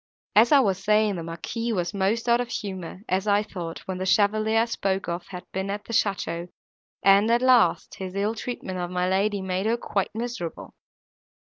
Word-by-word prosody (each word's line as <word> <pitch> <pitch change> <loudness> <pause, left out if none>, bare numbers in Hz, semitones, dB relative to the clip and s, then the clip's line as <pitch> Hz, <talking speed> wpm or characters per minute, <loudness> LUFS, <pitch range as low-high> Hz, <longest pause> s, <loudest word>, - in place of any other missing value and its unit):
As 225 +3 +6
I 285 -2 +7
was 195 -4 0
saying, 210 0 +3
the - - -4
Marquis 170 +8 -4
was 175 -3 -1
most 205 +4 0
out 235 +1 +4
of 245 - -5
humour, 190 -5 -5
as 190 +3 0
I 205 0 +3
thought, 175 -6 -7
when 185 -1 -4
the 185 - -2
chevalier 215 +2 +3
I - - +2
spoke 195 -5 -2
of 175 +1 -4
had 180 -2 -8
been 190 +1 -3
at 205 0 -4
the 230 - -7
château, 180 -5 0 0.6
and, 200 +3 +5
at 235 +2 +3
last, 255 -2 +4
his 190 -1 -6
ill 205 +2 0
treatment 205 -5 -5
of 175 0 -3
my 180 0 0
lady 195 +1 +1
made 190 +2 -1
her 230 +1 +2
quite 200 -4 -2
miserable. 230 -7 -5
200 Hz, 200 wpm, -25 LUFS, 185-220 Hz, 0.6 s, I